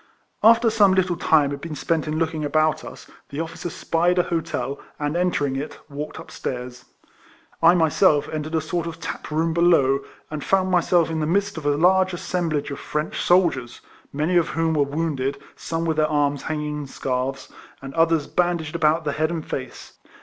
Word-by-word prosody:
After 230 +1 +6
some 205 -4 +4
little 185 -2 +1
time 155 -4 +3
had 140 0 -5
been 165 -1 -6
spent 155 +3 -1
in 155 0 -2
looking 160 -1 -1
about 155 +1 +1
us, - - -10 0.2
the 140 - -6
officers 165 +1 -5
spied 175 +2 +1
an 180 - +3
hotel, 165 -4 -3 0.2
and 145 +1 -2
entering 170 -6 0
it, 140 +3 -5
walked 145 +2 -6
up - - -11
stairs. 125 -1 -6 0.8
I 170 +2 +7
myself 160 -2 +3
entered 155 +1 -4
a 160 - +2
sort 170 +2 -3
of 165 0 -7
taproom 160 0 -2
below, 160 -6 +4 0.3
and 150 -2 -4
found 190 -1 +1
myself 175 -2 +3
in 160 - -1
the 155 - -1
midst 200 +4 0
of 155 -3 -4
a 145 0 +2
large 185 +3 +4
assemblage 160 -5 -2
of 140 - -5
French 150 +1 -3
soldiers, 170 -10 +2 0.3
many 155 +5 +1
of 170 - +2
whom 165 0 +2
were 150 - +2
wounded, 140 -2 -2 0.2
some 165 0 -3
with 160 -2 0
their 155 0 +3
arms 145 -2 +1
hanging 150 -1 -3
in 145 - -6
scarfs, 130 0 -3 0.3
and 135 0 -9
others 165 -2 +2
bandaged 170 -3 -1
about 160 0 +2
the 150 - 0
head 155 +2 0
and 165 -2 -4
face. 130 -1 -7
160 Hz, 185 wpm, -23 LUFS, 145-170 Hz, 0.8 s, I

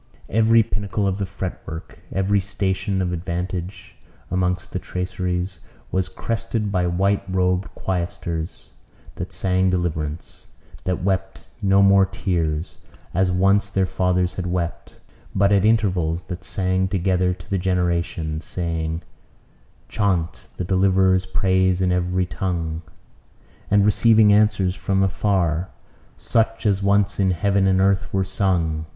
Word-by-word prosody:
Every 115 +1 +4
pinnacle 105 -1 -2
of 95 0 -1
the 100 - -2
fretwork, 90 -4 -7
every 95 +1 +1
station 95 0 -1
of 90 -1 -2
advantage 90 +2 -5 0.3
amongst 90 0 -1
the 95 - -2
traceries, 90 0 -3 0.3
was 95 -1 0
crested 115 -2 -2
by 90 -2 +1
white 95 +3 +1
robed 90 0 +1
choristers, 85 -2 -4 0.5
that - - -5
sang 95 0 +1
deliverance; 80 -4 -3 0.4
that 90 -2 -1
wept 95 0 -2
no 100 -1 +4
more 100 0 +5
tears, 85 -5 -2 0.3
as 90 +1 +2
once 100 +2 +3
their 95 -1 +1
fathers 90 -1 0
had 90 +3 -4
wept; 85 -1 -3 0.4
but 100 +1 +3
at 100 -2 +4
intervals 90 -7 +1
that 90 0 -7
sang 95 -1 0
together 95 -1 +1
to 90 0 -15
the 100 -1 -1
generations, 85 -3 -1
saying 80 -1 -3 0.8
"Chaunt 90 -5 -1
the - - -2
deliverer's 95 0 +3
praise 95 -1 +2
in 90 -1 +2
every 90 +1 +1
tongue," 85 -4 -3 0.9
and 100 0 +4
receiving 110 0 +5
answers 100 -3 +3
from 95 +1 0
afar, 95 -3 0 0.5
"such 115 0 0
as 100 -2 +2
once 100 0 +2
in 95 -1 +3
heaven 95 +2 +2
and 95 0 +3
earth 95 0 +2
were 95 0 +1
sung." 90 -5 0
95 Hz, 130 wpm, -22 LUFS, 90-100 Hz, 0.9 s, more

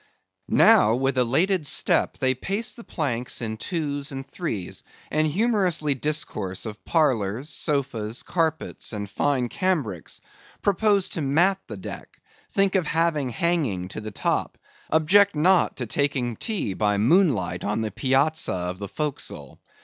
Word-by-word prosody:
Now, 110 +2 +6
with 135 +1 0
elated 155 +7 +2
step, - - +2
they 130 -1 +2
pace 200 - -3
the 235 - -12
planks 125 - -2
in 110 -2 -3
twos 145 -2 -3
and 135 0 -6
threes, 110 - -4 0.3
and 155 0 +2
humorously 180 -5 +1
discourse 130 - -2
of 105 -1 -7
parlors, 130 - +1
sofas, 135 -8 -2
carpets, 160 -7 -2
and 105 -1 -4
fine 130 +4 0
cambrics; 135 - -2 0.4
propose 200 0 +2
to 165 - -4
mat 170 +8 +3
the 105 - -7
deck; 95 - -8 0.3
think 195 -1 +2
of 185 -5 +1
having 160 -5 +1
hanging 125 - 0
to 110 - -6
the 110 - -6
top; 105 - -1 0.3
object 190 +5 +4
not 175 +4 +3
to 125 - -2
taking 125 -1 -1
tea 205 - -2
by 105 +1 +1
moonlight 110 - +2
on 105 +2 -1
the 110 -1 -2
piazza 140 - +1
of 90 +1 -4
the 100 - -5
forecastle. 150 +7 -4
140 Hz, 140 wpm, -24 LUFS, 110-170 Hz, 0.4 s, Now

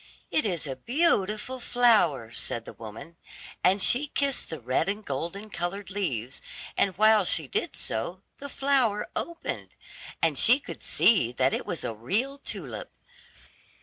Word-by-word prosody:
"It 310 - +2
is 175 -7 0
a 135 -2 -4
beautiful 240 - 0
flower," 210 - +3
said 115 0 -3
the - - -9
woman, 115 +10 -10 0.5
and 190 +3 +4
she 275 +5 +4
kissed 275 -1 -1
the 160 - -5
red 130 +10 0
and 205 +1 -3
golden 170 +10 -4
colored 190 +3 -4
leaves, 130 - -3 0.3
and 190 -3 +1
while 215 0 +6
she 160 -4 0
did - - -2
so 170 - -2 0.2
the 285 - -7
flower 265 -7 +1
opened, 340 0 -5 0.4
and 155 -4 +2
she 245 +4 +6
could - - -9
see 180 - +4
that 130 +1 +2
it - - -3
was 170 - -3
a - - -2
real 220 - -1
tulip. - - -6
195 Hz, 150 wpm, -27 LUFS, -, 0.5 s, while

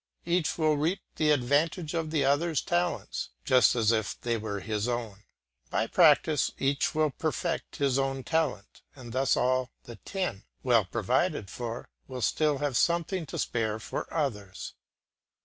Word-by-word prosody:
Each 170 -1 +1
will 155 -2 +2
reap 165 +6 0 0.2
the 155 - +2
advantage 150 +4 +1
of 165 -2 -1
the 155 -2 +1
others' 145 +2 +2
talents, 90 +1 -1 0.2
just 130 -1 +5
as 115 -2 +3
if 110 -2 -1
they 120 -1 -1
were 105 -2 -3
his 105 +2 -2
own; 115 -5 -3 0.5
by 110 - +1
practice 155 0 +4
each 140 +2 0
will 155 -1 +2
perfect 160 +3 -3
his 135 -2 +1
own 135 -1 -1
talent, 155 -11 -2
and 120 -4 -10
thus 130 +1 +2
all 130 0 +1
the 120 -2 -10
ten, 185 - -4 0.2
well 120 -5 +4
provided 95 +1 0
for, 120 -1 -5 0.2
will 130 -3 -5
still 150 +2 +2
have 140 -2 -2
something 170 0 +1
to - - -6
spare 110 -2 -1
for 110 - -5
others. 105 - -3
135 Hz, 155 wpm, -29 LUFS, 115-155 Hz, 0.5 s, just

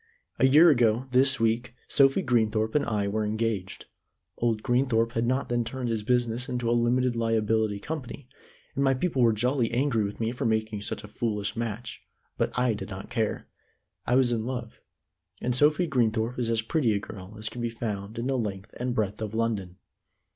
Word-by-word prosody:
A 130 - +6
year 155 +5 +7
ago, 120 -2 +2
this 135 +2 +4
week, 115 +2 0
Sophie 135 -1 +4
Greenthorpe 110 -3 +1
and 150 - +2
I 105 -3 -1
were 110 +2 -1
engaged. 105 -3 -2 0.5
Old 115 -2 0
Greenthorpe 120 -2 +2
had 115 0 -1
not 130 +2 0
then 120 0 0
turned 125 +1 -4
his 115 -2 -1
business 120 +1 0
into 125 -1 -2
a - - +2
limited 120 +1 +2
liability 110 -2 +1
company, 140 0 -6 0.5
and 140 - 0
my 135 -1 +3
people 135 -1 0
were 115 -1 +5
jolly 120 +2 +1
angry 120 -2 +1
with 100 0 -5
me 115 0 0
for 125 +3 -5
making 110 -2 0
such 105 - -4
a - - -8
foolish 105 -1 -2
match; 115 0 -4 0.3
but - - 0
I 125 -2 +2
did 105 - -6
not 95 -1 -8
care. 110 -3 -1 0.6
I 125 - +3
was 130 -2 +4
in 115 -2 0
love, 120 -2 -5 0.6
and 125 - -1
Sophie 150 +6 +4
Greenthorpe 120 -4 0
is 120 -2 0
as 115 -1 +1
pretty 120 -2 +1
a - - 0
girl 100 0 -10
as 110 0 -4
can 120 - -5
be 120 - -1
found 110 -2 -5
in 115 - -2
the 135 -1 0
length 100 -3 -5
and 125 0 -2
breadth 105 -1 -1
of 110 0 -4
London. 105 -6 -2
115 Hz, 195 wpm, -27 LUFS, 110-125 Hz, 0.6 s, year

